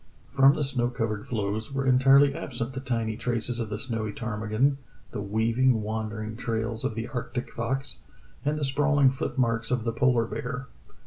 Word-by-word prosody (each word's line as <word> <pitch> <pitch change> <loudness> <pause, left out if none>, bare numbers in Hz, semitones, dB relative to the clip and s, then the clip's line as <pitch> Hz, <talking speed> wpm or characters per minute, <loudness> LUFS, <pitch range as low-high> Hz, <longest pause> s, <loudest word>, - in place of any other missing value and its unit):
From 135 +1 +6
the 150 - 0
snow 130 -3 +1
covered 115 -4 -3
floes 110 0 -2
were 135 0 -1
entirely 135 +2 +6
absent 120 -2 -4
the 130 - -4
tiny 115 -4 -1
traces 120 +1 -1
of 115 -3 -3
the 105 - -3
snowy 115 -2 -3
ptarmigan, 110 +5 0 0.3
the 105 - -4
weaving, 115 +3 +2
wandering 110 0 -3
trails 115 -1 -2
of 110 - -1
the 115 +1 -3
arctic 125 -1 -4
fox, 130 +3 -2 0.5
and 150 +1 0
the 150 - 0
sprawling 140 0 +3
foot 135 +1 -4
marks 115 -2 +1
of 125 -2 0
the 115 -1 -1
polar 120 -1 +3
bear. 125 +3 -4
120 Hz, 175 wpm, -27 LUFS, 110-135 Hz, 0.5 s, From